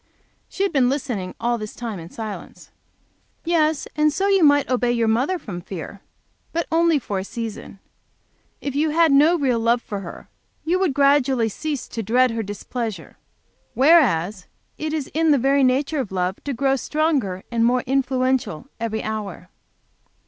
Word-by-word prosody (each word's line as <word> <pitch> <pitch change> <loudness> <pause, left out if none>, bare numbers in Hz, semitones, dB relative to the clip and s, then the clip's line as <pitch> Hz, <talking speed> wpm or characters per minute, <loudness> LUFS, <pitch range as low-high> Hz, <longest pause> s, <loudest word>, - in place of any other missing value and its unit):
She 390 - -2
had 395 - 0
been 260 -4 +3
listening 245 -9 -3
all 240 0 0
this 215 0 -7
time 225 -6 -5
in 165 0 -9
silence. 215 0 -8 0.7
"Yes; 315 -3 +1
and 305 0 +3
so 385 +6 -1
you 390 -3 +4
might 285 -2 +5
obey 245 -1 +1
your 235 -2 +1
mother 255 +12 +1
from 200 - -7
fear, 190 +2 -8 0.5
but 335 0 -1
only 330 -1 +3
for 205 -7 -3
a - - -4
season. 225 -1 -7 0.8
If 280 - -3
you 300 +3 +1
had 325 0 +3
no 300 +5 +5
real 260 -6 +1
love 230 +2 +2
for 205 -4 -6
her 175 -3 -9 0.4
you 355 +3 +1
would 360 -8 +1
gradually 275 -4 +3
cease 295 +5 -4
to 230 - -4
dread 245 +4 +3
her 230 0 -2
displeasure, 205 -2 -6 0.6
whereas 215 - +3 0.3
it 310 0 -4
is 305 -3 -2
in 320 +1 +2
the 290 - +5
very 275 +2 +3
nature 275 +4 +1
of 235 -8 -3
love 185 0 -2
to 285 - -2
grow 270 +2 +2
stronger 270 - -1
and 230 -1 +1
more 245 +1 +2
influential 260 - 0
every 225 -1 -3
hour." 205 -5 -5
255 Hz, 170 wpm, -22 LUFS, 220-295 Hz, 0.8 s, might